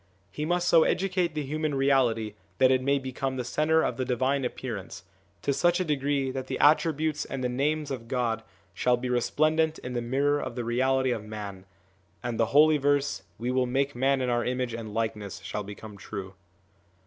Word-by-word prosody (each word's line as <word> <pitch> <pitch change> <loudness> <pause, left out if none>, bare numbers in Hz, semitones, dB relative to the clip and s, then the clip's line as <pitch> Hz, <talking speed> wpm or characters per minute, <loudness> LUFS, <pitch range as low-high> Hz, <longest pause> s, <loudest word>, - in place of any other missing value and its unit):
He 150 - -3
must 175 +2 0
so 165 - +6
educate 180 -2 +1
the 150 - -1
human 155 +1 -2
reality 130 -6 +2 0.2
that 130 0 +5
it 130 -1 +3
may 140 +2 +2
become 130 0 -3
the 125 - -2
centre 155 +6 +2
of 120 - -1
the 130 - 0
divine 130 +2 0
appearance, 115 -7 -5 0.4
to 140 - +1
such 175 +6 +2
a 185 - 0
degree 140 -2 0
that 130 0 -5
the - - -3
attributes 155 0 +3
and 135 -1 -5
the 125 - +1
names 145 +4 -1
of 120 -4 -5
God 115 -3 -1 0.3
shall 125 +6 +2
be 125 +1 -4
resplendent 155 +6 +2
in 125 - -7
the 120 - -1
mirror 140 +4 +1
of - - -5
the 120 - -3
reality 130 +2 +1
of 110 -3 -2
man, 105 -3 -7 0.6
and 120 -2 -3
the 115 - +3
holy 150 +3 +5
verse, 145 -5 +1
' 85 - -37
We 120 +3 -2
will 130 0 +1
make 135 +3 0
man 135 +2 +1
in 125 - 0
Our 120 0 +1
image 125 -1 -2
and 115 -2 -6
likeness/ 105 -3 -3
shall 105 - -3
become 105 +1 -9
true. 95 -1 -7
130 Hz, 200 wpm, -27 LUFS, 120-145 Hz, 0.6 s, so